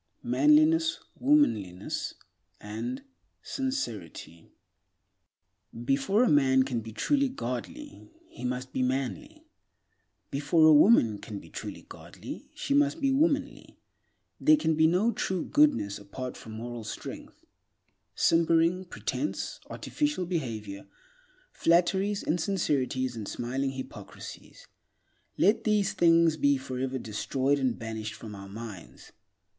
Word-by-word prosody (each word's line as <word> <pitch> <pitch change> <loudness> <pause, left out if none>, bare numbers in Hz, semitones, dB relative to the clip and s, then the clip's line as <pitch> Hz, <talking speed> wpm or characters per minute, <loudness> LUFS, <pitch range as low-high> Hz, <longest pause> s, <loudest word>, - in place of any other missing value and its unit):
Manliness, 310 +2 +4 0.2
Womanliness 110 - +1 0.4
and 245 - -5 0.4
Sincerity 110 - -5 1.4
BEFORE 140 - +2
A - - +3
MAN 130 -4 +4
CAN 125 -3 -2
BE 110 0 -9
TRULY 280 - +1
GODLY, 260 - -6 0.2
he 330 - -12
must 125 +1 -3
be - - -1
manly; 130 -6 -3 0.9
before 145 +3 +3
a 155 - +8
woman 145 - +5
can 105 - -7
be - - -12
truly - - -7
godly, - - -10
she 280 - -2
must 290 +2 +3
be 275 -2 +2
womanly. 290 +1 0 0.6
There 310 0 +5
can 160 - +1
be 160 +1 +4
no 185 +8 +2
true 185 -6 -2
goodness 285 - +2
apart 125 +6 -7
from 110 - -10
moral 120 +1 -6
strength. 110 - -8 0.8
Simpering, 165 +2 +3
pretense, 180 - -4
artificial 295 -11 -2
behavior, 110 - -4 0.6
flatteries, 190 +4 +2
insincerities 145 -7 0
and 110 -3 -6
smiling 135 +3 -2
hypocrisies—let 205 - -5
these 210 -3 +2
things 165 -2 +4
be 140 -1 +3
forever 130 0 -3
destroyed 130 +5 -1
and 130 -3 0
banished 110 -1 -5
from 110 -1 -9
our 100 -1 -9
minds. 105 -4 -10
140 Hz, 110 wpm, -28 LUFS, -, 1.4 s, a